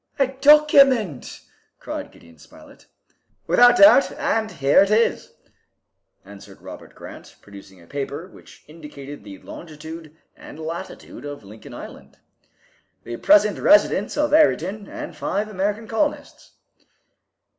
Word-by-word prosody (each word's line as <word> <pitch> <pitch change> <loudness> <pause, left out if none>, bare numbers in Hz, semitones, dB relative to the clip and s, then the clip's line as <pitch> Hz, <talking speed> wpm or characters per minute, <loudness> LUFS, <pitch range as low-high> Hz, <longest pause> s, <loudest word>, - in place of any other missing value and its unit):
"A 275 - +3
document!" 270 - +3 0.4
cried - - -7
Gideon 85 -2 -20
Spilett. - - -18 0.6
"Without 245 +8 +5
doubt, 300 -2 +6
and 225 -7 -2
here 140 -1 +2
it 200 - +2
is," 220 +2 0 0.9
answered 100 0 -15
Robert - - -13
Grant, - - -13
producing 100 -1 -15
a 85 - -18
paper 140 - -6
which - - -18
indicated 145 -4 -12
the 100 -2 -11
longitude 160 - -11 0.2
and - - -13
latitude 160 -5 -8
of 145 -5 -9
Lincoln 105 +2 -13
Island, - - -12 0.9
"the 120 - -7
present 205 - +3
residence 310 0 +2
of 295 0 0
Ayrton 210 - +1
and - - -9
five 205 +2 -3
American 210 +2 -3
colonists." 285 +7 -4
175 Hz, 120 wpm, -21 LUFS, 140-230 Hz, 0.9 s, doubt